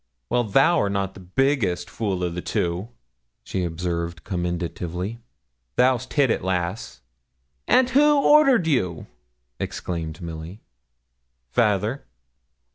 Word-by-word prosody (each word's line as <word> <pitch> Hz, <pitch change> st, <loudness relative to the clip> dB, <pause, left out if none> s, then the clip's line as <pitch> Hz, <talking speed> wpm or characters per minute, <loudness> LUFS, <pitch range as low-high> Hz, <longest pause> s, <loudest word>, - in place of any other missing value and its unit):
'Well, 120 Hz, 0 st, +2 dB
thou'rt 135 Hz, -, +4 dB
not 100 Hz, -1 st, -1 dB
the -, -, -12 dB
biggest 95 Hz, -3 st, 0 dB
fool 95 Hz, -1 st, -2 dB
o' 90 Hz, -, +1 dB
the 85 Hz, +1 st, -5 dB
two,' 90 Hz, +6 st, -2 dB, 0.5 s
she 95 Hz, -, -3 dB
observed, 85 Hz, -1 st, -3 dB
commendatively, 90 Hz, +3 st, -3 dB, 0.6 s
'thou'st 125 Hz, 0 st, +2 dB
hit 140 Hz, -5 st, +3 dB
it, -, -, -1 dB
lass.' 95 Hz, +2 st, -3 dB, 0.7 s
'And 255 Hz, 0 st, +4 dB
who 295 Hz, +2 st, +5 dB
ordered 275 Hz, -, +5 dB
you?' 95 Hz, -, 0 dB, 0.5 s
exclaimed 80 Hz, -2 st, -4 dB
Milly. 85 Hz, +4 st, -8 dB, 0.9 s
'Fayther.' 110 Hz, -, +1 dB
95 Hz, 110 wpm, -24 LUFS, 85-130 Hz, 0.9 s, who